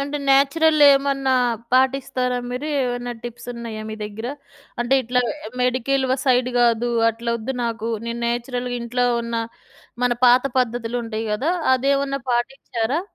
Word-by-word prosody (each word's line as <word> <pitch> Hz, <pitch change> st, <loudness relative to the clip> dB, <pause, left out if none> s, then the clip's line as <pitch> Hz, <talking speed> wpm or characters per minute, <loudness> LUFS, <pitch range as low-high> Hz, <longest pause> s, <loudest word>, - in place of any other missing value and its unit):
అంటే 285 Hz, +1 st, -3 dB
నేచురల్‌ 295 Hz, +3 st, +4 dB
ఏమన్నా 275 Hz, -1 st, 0 dB, 0.4 s
పాటిస్తారా? 255 Hz, -1 st, +1 dB
మీరు 255 Hz, +5 st, -4 dB
ఏమన్నా 245 Hz, -1 st, -2 dB
టిప్స్ 240 Hz, 0 st, -8 dB
ఉన్నాయా? 230 Hz, -2 st, -6 dB
మీ 215 Hz, -, -5 dB
దగ్గర 220 Hz, +3 st, -6 dB, 0.5 s
అంటే 240 Hz, +3 st, +2 dB
ఇట్లా 250 Hz, +1 st, +1 dB, 0.4 s
మెడికల్ 260 Hz, +2 st, +1 dB, 0.2 s
సైడ్ 250 Hz, -1 st, +3 dB
గాదు. 240 Hz, 0 st, +2 dB, 0.2 s
అట్లా 235 Hz, +1 st, -3 dB
వద్దు. 245 Hz, +4 st, -4 dB
నాకు 230 Hz, -1 st, -3 dB, 0.2 s
నేను 235 Hz, 0 st, -4 dB
నేచురల్‌గా 245 Hz, +1 st, -2 dB
ఇంట్లో 245 Hz, +1 st, 0 dB, 0.2 s
ఉన్న 235 Hz, 0 st, -5 dB, 0.7 s
మన 245 Hz, -, +3 dB
పాత 245 Hz, +1 st, +6 dB, 0.2 s
పద్ధతులుంటాయి 230 Hz, -2 st, -2 dB
గదా! 265 Hz, +10 st, 0 dB, 0.2 s
అదేమన్నా 275 Hz, +1 st, 0 dB
పాటిచ్చారా? 240 Hz, +2 st, -1 dB
245 Hz, 130 wpm, -22 LUFS, 235-270 Hz, 0.7 s, పాత